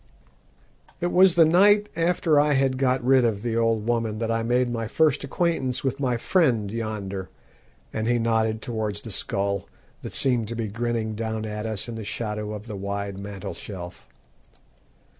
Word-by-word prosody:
"It 175 +1 -1
was 185 -1 +6
the 165 -2 +7
night 205 +5 +5
after 165 -3 +2
I 150 0 +3
had 135 -1 +1
got 130 -1 +2
rid 130 0 +5
of 110 -3 0
the 115 -2 -1
old 115 -1 +1
woman 115 -2 0
that 115 0 -1
I 115 0 +1
made 120 +2 +2
my 115 -2 -3
first 155 +4 +2
acquaintance 140 -3 -1
with 135 0 -1
my 125 -3 0
friend 120 - +2
yonder," 105 -4 -4 0.6
and 110 0 -2
he 120 0 +3
nodded 110 -1 +1
towards 110 -3 -3
the 115 - -7
skull 100 0 -1 0.3
that - - -7
seemed 125 -5 +1
to 115 - -5
be 115 -2 -3
grinning 115 0 -2
down 110 0 -3
at 105 0 -4
us 110 -1 -2
in 120 - -5
the 110 -1 -6
shadow 105 0 -3
of 105 0 -6
the 110 -3 -6
wide 100 0 -4
mantelshelf. 100 -2 -8
115 Hz, 175 wpm, -25 LUFS, 105-130 Hz, 0.6 s, the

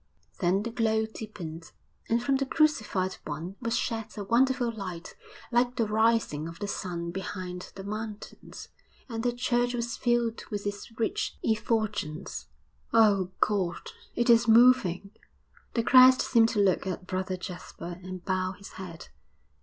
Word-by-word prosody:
Then 190 +2 +2
the 235 - -4
glow 220 -1 +1
deepened, 180 -7 -8 0.4
and 235 +1 +2
from 270 +2 +2
the 275 - -1
Crucified 215 - +1
One 160 +5 -5
was 230 -1 0
shed 225 -1 -2
a 205 - -3
wonderful 245 +3 +2
light 185 -6 -7 0.4
like 245 +1 +2
the 235 -3 +1
rising 215 -8 +1
of 165 0 -9
the 205 - -4
sun 170 -3 -4
behind 185 -1 -6
the 195 - -7
mountains, 215 +1 -7 0.4
and 225 -3 -4
the 245 +1 +1
church 245 0 0
was 235 0 -3
filled 240 -2 0
with 205 -2 -4
its 205 +3 -5
rich 225 - -1
effulgence. 215 -7 -1 0.4
'Oh, 205 -5 +4
God, 190 -5 0 0.2
it 240 - +1
is 235 0 +6
moving!' 220 -5 +5 0.6
The 230 - +2
Christ 255 +3 +8
seemed 230 -2 +4
to 220 - -1
look 190 -1 +2
at 180 -1 -4
Brother 185 0 -2
Jasper 175 -1 -8
and 185 -1 -8
bow 185 -1 0
His 195 +1 -12
head. 180 -4 -9
210 Hz, 150 wpm, -28 LUFS, 185-235 Hz, 0.6 s, Christ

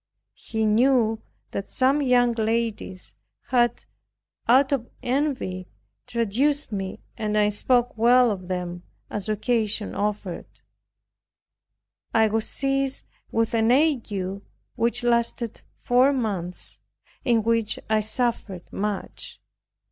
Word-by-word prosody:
He 220 -1 -3
knew 225 0 +3 0.3
that 200 - -4
some 270 +3 +2
young 245 -3 +4
ladies 225 -4 -2 0.4
had, 240 -2 +2 0.6
out 265 +4 +5
of 255 -4 -1
envy, 250 -9 -1 0.4
traduced 245 +5 +1
me 195 -2 -4 0.2
and 215 -2 -1
that 210 - +4
I 205 - +3
spoke 245 +4 +1
well 245 +1 +6
of 185 -3 -5
them 180 -1 -3 0.3
as 210 0 -3
occasion 215 -1 0
offered. 205 -3 -3 1.7
I 220 -1 +5
was 220 +1 -1
seized 275 0 -1 0.3
with 225 0 +1
an 225 0 +3
ague, 215 -10 +1 0.3
which 240 +1 0
lasted 235 -1 0 0.2
four 250 +3 +4
months, 200 -9 -3 0.4
in 230 -3 +3
which 230 -1 +1
I 220 0 +3
suffered 215 -4 -2
much. 205 0 -4
230 Hz, 110 wpm, -25 LUFS, 210-250 Hz, 1.7 s, well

